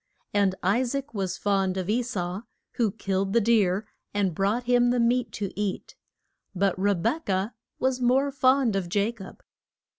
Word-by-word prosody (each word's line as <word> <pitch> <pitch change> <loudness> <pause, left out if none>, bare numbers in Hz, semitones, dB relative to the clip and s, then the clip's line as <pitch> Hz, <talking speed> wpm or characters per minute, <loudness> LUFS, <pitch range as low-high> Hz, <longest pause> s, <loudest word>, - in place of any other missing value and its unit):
And 200 -2 +2
I 200 +7 +3
saac 275 +2 -3
was 195 -4 -2
fond 195 -2 0
of 185 -2 -2
E 225 +4 +2
sau, 190 -5 -3 0.3
who 230 -3 +1
killed 195 0 -2
the 235 - +5
deer, 210 -3 +2 0.3
and 195 -4 +1
brought 200 +8 0
him 245 0 +3
the 245 0 +1
meat 235 -1 +2
to 200 -3 -3
eat. 205 -2 -3 0.6
But 195 0 +2
Re 200 +1 +2
bek 230 - -2
ah 190 +3 0 0.3
was 260 -1 0
more 265 +3 +3
fond 260 -4 +3
of 180 -3 -2
Ja 205 +3 +2
cob. 205 -5 -12
205 Hz, 175 wpm, -26 LUFS, 195-245 Hz, 0.6 s, the